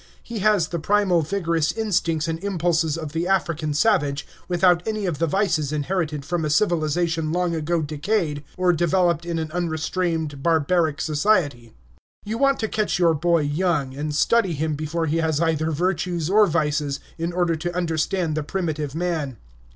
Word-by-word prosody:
He 230 -2 -6
has 200 -5 +2
the 170 - -3
primal, 190 0 +2
vigorous 165 -2 0
instincts 170 -7 0
and 165 +2 -3
impulses 170 -5 0
of 155 -3 -5
the 165 +3 -2
African 170 -5 0
savage, 150 -7 +2 0.2
without 175 -1 +3
any 215 -2 -2
of 165 -6 -2
the 165 - +2
vices 165 -5 0
inherited 155 -1 -2
from 175 0 -1
a 155 - -1
civilization 165 -1 +1
long 175 0 0
ago 165 +1 -1
decayed 150 0 -1
or 180 -1 +3
developed 175 0 +1
in 170 -1 -2
an 160 -1 -3
unrestrained 165 -3 -2
barbaric 160 0 +1
society. 145 - 0 0.5
You 220 +3 -3
want 275 -1 +3
to 220 - 0
catch 215 -3 -1
your 170 -2 +4
boy 170 +1 +2
young, 145 -2 0
and 150 +2 -4
study 205 +2 +3
him 155 +1 -1
before 155 +3 -2
he 160 +1 0
has 160 -2 0
either 160 -1 +1
virtues 175 +1 -1
or 210 0 +6
vices, 150 -3 0 0.2
in 165 +1 -1
order 175 -1 +1
to 175 +2 -4
understand 165 0 0
the 155 - -1
primitive 155 -3 -3
man. 160 -7 -2
165 Hz, 165 wpm, -23 LUFS, 155-180 Hz, 0.5 s, or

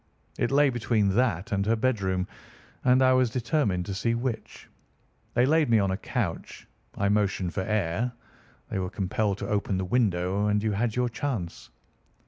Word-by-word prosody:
It - - +1
lay 140 0 +4
between 110 -5 +1
that 105 -6 0
and 100 -1 +1
her 115 - +3
bedroom, 95 -6 0 0.6
and 125 +1 +4
I 130 0 +5
was 130 -1 +3
determined 120 - 0
to 100 - -4
see 115 +4 0
which. 120 -1 -4 0.7
They 120 - +4
laid 155 0 +3
me 115 - +5
on 100 -2 +2
a - - 0
couch, - - -4 0.3
I 100 - +1
motioned 100 -3 0
for 95 - -1
air, 105 +3 -1 0.6
they - - -1
were 90 -1 -2
compelled 100 +1 -1
to 100 - -5
open 100 -2 0
the 95 - -2
window, 100 -2 +1
and 105 0 +1
you 110 - +1
had 110 +2 -1
your 125 0 +1
chance." 115 -8 -4
105 Hz, 175 wpm, -27 LUFS, 95-125 Hz, 0.7 s, I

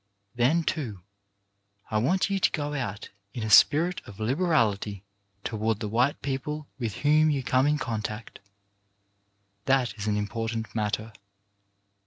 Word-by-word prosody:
Then, 130 +8 +2
too, 120 - -3 0.9
I 110 - +2
want 175 - +2
you 195 - +1
to - - +3
go 145 -2 -2
out 110 -8 -4 0.3
in 120 - -3
a 110 - -2
spirit 170 - +5
of 100 0 -11
liberality 110 - +1 0.4
toward 110 -1 -1
the 110 - -3
white 120 +7 +1
people 145 +2 -3
with 115 -4 -3
whom 155 +1 +5
you 140 -3 0
come 130 +1 +2
in 150 0 +2
contact. 110 -4 -5 1.3
That 130 -5 +2
is 105 - -3
an 105 -1 +1
important 115 +2 -3
matter. 110 0 -2
120 Hz, 140 wpm, -27 LUFS, 110-145 Hz, 1.3 s, spirit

